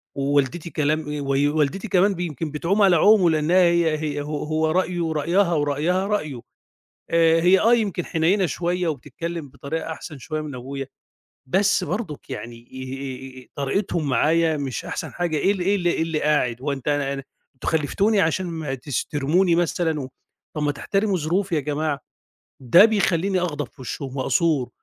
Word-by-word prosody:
ووالدتي 140 +4 0
كلام 155 -1 -1
أي 150 - -3
وي 140 +1 +1
والدتي 155 +8 0
كمان 195 +2 +3
ب - - -10
يمكن 155 -2 -4
بتعوم 175 +7 0
على 190 -3 +6
عومه 195 0 +5
لإنّها 160 +4 +2
هي 170 -2 +3
هي 145 -2 -2
ه - - -4
هو 155 +1 -1
رأيه 175 -2 0
رأيها، 170 +4 +2
ورأيها 155 +6 0
رأيه. 155 - -2 0.7
آآ 165 0 +4
هي 180 +3 +5
آه، 230 +2 +5
يمكن 200 -7 0
حنيّنة 180 +4 +2
شوية 175 +1 -1
وبتتكلِّم 165 +1 -5
بطريقة 150 +4 -5
أحسن 155 -2 -8
شوية 155 +5 -4
من 150 -3 -6
أبويا، 135 +2 -6 0.6
بس 195 +4 +2
برضُك 170 -5 -5
يعني 120 -2 -8 0.7
آآ، - - -11
آآ - - -21
طريقتهم 150 +2 -1
معايا 160 +5 +2
مش 135 -3 -4
أحسن - - -4
حاجة 175 -3 -1
إيه 195 - +3
ال 190 - -5
إيه 200 +3 +2
ال 175 -2 -3
إيه 170 - +2
اللي 160 -2 -2
قاعد، 130 -5 +1
هو 145 - -1
أنت 135 +1 -4
أنا 145 -1 0
أنا 135 - -5 0.3
أنتم 130 - -5
خلِّفتوني 200 +8 +1
عشان 180 +2 +1
ما 160 -5 -4
تس 135 0 -3
ترموني 165 +5 +2
مثلًا 165 -2 0
و 130 - -5 0.5
طَب 150 - -1
ما 145 - +1
تحترموا 195 +6 0
ظروفي 175 +4 0
يا - - +2
جماعة. 150 0 -2 0.6
ده 170 - +7
بيخلّيني 195 -3 +1
أغضب 150 -6 -2
في 130 - -17
وِشّهم 135 +2 -6
وأثور 150 -2 +1
160 Hz, 175 wpm, -23 LUFS, 145-180 Hz, 0.7 s, ده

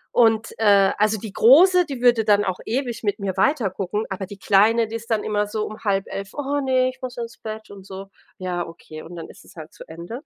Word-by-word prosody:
Und, 225 -1 +3
äh, 200 -3 +5
also, 215 +1 +2
die 205 -1 -8
Große, 355 +8 +6
die 270 -4 -6
würde 240 -2 +4
dann 205 -1 +3
auch 185 -1 -3
ewig 240 -1 -3
mit 205 -2 -1
mir 195 -3 -4
weiter 230 -1 +1
gucken, 205 +3 -3
aber 190 -1 -4
die 200 -1 -10
Kleine, 215 +4 +3
die 225 - -7
ist 230 +1 -8
dann 220 -2 0
immer 210 -1 -1
so 215 +1 -3
um 215 - -9
22:30: 195 -1 -3
„Oh 285 0 -2
ne, 255 -1 +2
ich 255 +1 -12
muss 255 -1 -6
ins 230 -1 -7
Bett“ 215 -1 -8
und 195 -1 -12
so. 195 0 -9 0.3
Ja, 180 -1 -3
okay, 155 -2 -11
und 175 +2 -11
dann 165 - -8
ist - - -15
es - - -19
halt 155 -1 -11
zu - - -12
Ende. 170 - -8
215 Hz, 240 wpm, -22 LUFS, 195-240 Hz, 0.3 s, Große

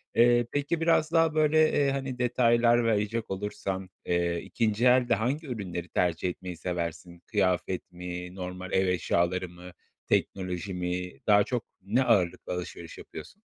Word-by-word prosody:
Eee, 120 0 +5
peki 145 +3 -1
biraz 165 -1 +3
daha 165 -2 +3
böyle, 155 0 +4
eee, 140 -1 +2
hani, 135 -2 -4
detaylar 120 -1 +3
verecek 110 +1 0
olursan, 95 -1 -4 0.2
eee, 85 -1 0
2'nci 110 0 0
elde 125 0 +5
hangi 135 +9 -2
ürünleri 90 -8 -5
tercih 90 0 0
etmeyi 90 0 -7
seversin? 85 0 -4
Kıyafet 95 -3 0
mi, 90 0 -7
normal 90 0 -6
ev 95 0 +3
eşyaları 90 0 0
mı, 90 +1 -12 0.4
teknoloji 95 0 -1
mi 90 0 -3 0.2
daha 105 -1 +6
çok 120 +1 -3 0.2
ne 110 +8 +1
ağırlıklı 100 -10 +1
alışveriş 85 -1 -7
yapıyorsun? 190 - -11
95 Hz, 140 wpm, -28 LUFS, 90-120 Hz, 0.4 s, daha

